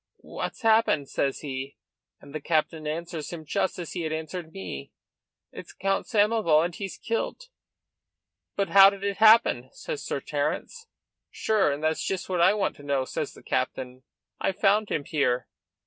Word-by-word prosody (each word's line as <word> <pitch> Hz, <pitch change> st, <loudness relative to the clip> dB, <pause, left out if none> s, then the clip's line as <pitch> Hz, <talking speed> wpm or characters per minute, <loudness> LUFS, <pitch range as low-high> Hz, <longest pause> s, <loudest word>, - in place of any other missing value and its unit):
'What's -, -, -6 dB
happened?' 220 Hz, -10 st, +3 dB
says 135 Hz, -1 st, -1 dB
he, 135 Hz, -1 st, -5 dB, 0.4 s
and 140 Hz, -, -14 dB
the 155 Hz, -, -4 dB
captain 155 Hz, 0 st, 0 dB
answers 165 Hz, 0 st, -4 dB
him 165 Hz, -2 st, -7 dB
just 185 Hz, -, -1 dB
as 175 Hz, -3 st, -6 dB
he 180 Hz, -, -3 dB
had 160 Hz, -1 st, -2 dB
answered 160 Hz, +1 st, -5 dB
me: 85 Hz, -, -7 dB, 0.6 s
'It's -, -, -10 dB
Count 195 Hz, 0 st, -1 dB
Samoval, 205 Hz, -8 st, +3 dB
and 175 Hz, -, -4 dB
he's 195 Hz, +1 st, -6 dB
kilt. 475 Hz, -, -3 dB, 1.1 s
'But 200 Hz, -3 st, 0 dB
how 195 Hz, +2 st, +9 dB
did 200 Hz, 0 st, -8 dB
it 200 Hz, -1 st, -1 dB
happen?' 215 Hz, -, +5 dB
says 475 Hz, -3 st, -6 dB
Sir -, -, -2 dB
Terence. 460 Hz, -2 st, -3 dB, 0.4 s
'Sure 210 Hz, -8 st, +1 dB
and 145 Hz, +2 st, -4 dB
that's 160 Hz, 0 st, 0 dB
just 190 Hz, -1 st, -3 dB
what 180 Hz, -2 st, +1 dB
I 190 Hz, -, +5 dB
want 205 Hz, -, -1 dB
to 145 Hz, -, -13 dB
know,' 140 Hz, -2 st, 0 dB
says -, -, -4 dB
the -, -, -15 dB
captain; 130 Hz, 0 st, -2 dB, 0.4 s
'I 195 Hz, -, 0 dB
found 205 Hz, +3 st, +2 dB
him 145 Hz, -, -1 dB
here. 125 Hz, -5 st, 0 dB
170 Hz, 170 wpm, -26 LUFS, 145-200 Hz, 1.1 s, how